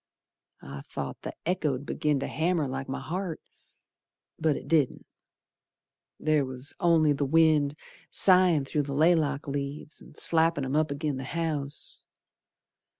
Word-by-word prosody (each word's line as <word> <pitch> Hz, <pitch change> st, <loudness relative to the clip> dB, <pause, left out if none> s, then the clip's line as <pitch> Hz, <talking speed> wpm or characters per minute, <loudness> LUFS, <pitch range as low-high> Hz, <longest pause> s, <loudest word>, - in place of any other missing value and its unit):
I 70 Hz, +1 st, -8 dB
thought -, -, -6 dB
the -, -, -7 dB
echo'd 150 Hz, -6 st, -1 dB
begin 150 Hz, -1 st, 0 dB
to -, -, -2 dB
hammer 165 Hz, -2 st, 0 dB
like 135 Hz, +1 st, -5 dB
my 130 Hz, -, -3 dB
heart, 180 Hz, -1 st, -4 dB, 1.0 s
But 155 Hz, -2 st, +2 dB
it -, -, -9 dB
didn't. 150 Hz, -5 st, +1 dB, 1.1 s
There 155 Hz, -2 st, +2 dB
was 130 Hz, +1 st, -6 dB
only 165 Hz, -4 st, +4 dB
th' 140 Hz, -, -5 dB
wind, 155 Hz, -2 st, +3 dB, 0.3 s
Sighin' 180 Hz, -6 st, +5 dB
through 150 Hz, +2 st, -1 dB
the 140 Hz, -, -3 dB
laylock 150 Hz, -3 st, +2 dB
leaves, 140 Hz, +2 st, -5 dB
An' -, -, -16 dB
slappin' 165 Hz, -3 st, +2 dB
'em 130 Hz, +2 st, -2 dB
up 155 Hz, 0 st, +2 dB
agin 145 Hz, -1 st, -2 dB
the 130 Hz, -, -5 dB
house. 150 Hz, -2 st, -3 dB
150 Hz, 140 wpm, -28 LUFS, 140-165 Hz, 1.1 s, Sighin